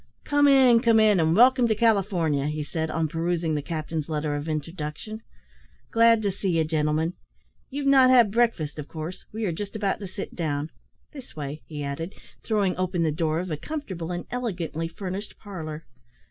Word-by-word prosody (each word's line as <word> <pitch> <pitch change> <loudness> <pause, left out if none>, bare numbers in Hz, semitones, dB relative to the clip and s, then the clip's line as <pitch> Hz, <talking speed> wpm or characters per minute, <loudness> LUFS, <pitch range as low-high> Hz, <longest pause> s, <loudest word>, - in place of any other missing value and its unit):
"Come 290 0 +3
in, 260 -4 +6
come 230 -1 +4
in, 210 -3 +5
and 160 0 +3
welcome 250 +2 +6
to 220 - +2
California," 190 -10 +2
he 150 0 -2
said, 160 +1 -3
on 160 0 0
perusing 165 0 -1
the 150 - -1
captain's 155 0 -4
letter 150 -1 -1
of 145 +2 -4
introduction. 155 +7 -5 0.7
"Glad 230 -1 +5
to 200 - +1
see 185 -3 -1
you, 160 - +3
gentlemen. 155 +1 0 0.6
You've 280 +1 -4
not 270 -2 +6
had 240 -5 +6
breakfast, 210 -11 +1
of 150 - -6
course; 160 +3 -7
we 220 +1 -3
are 185 - 0
just 200 +5 -6
about 205 -3 -1
to 200 - -6
sit 190 +2 -7
down. 155 -2 -2 0.4
This 275 -5 -12
way," 150 0 -5
he 150 -2 -5
added, 155 +6 -5 0.3
throwing 205 -4 0
open 185 -2 0
the 160 - +2
door 160 0 0
of 180 -1 -6
a 155 - -1
comfortable 185 - -5
and 175 0 -4
elegantly 175 -9 -3
furnished 190 +4 -6
parlour. 160 -6 -7
175 Hz, 185 wpm, -25 LUFS, 155-220 Hz, 0.7 s, in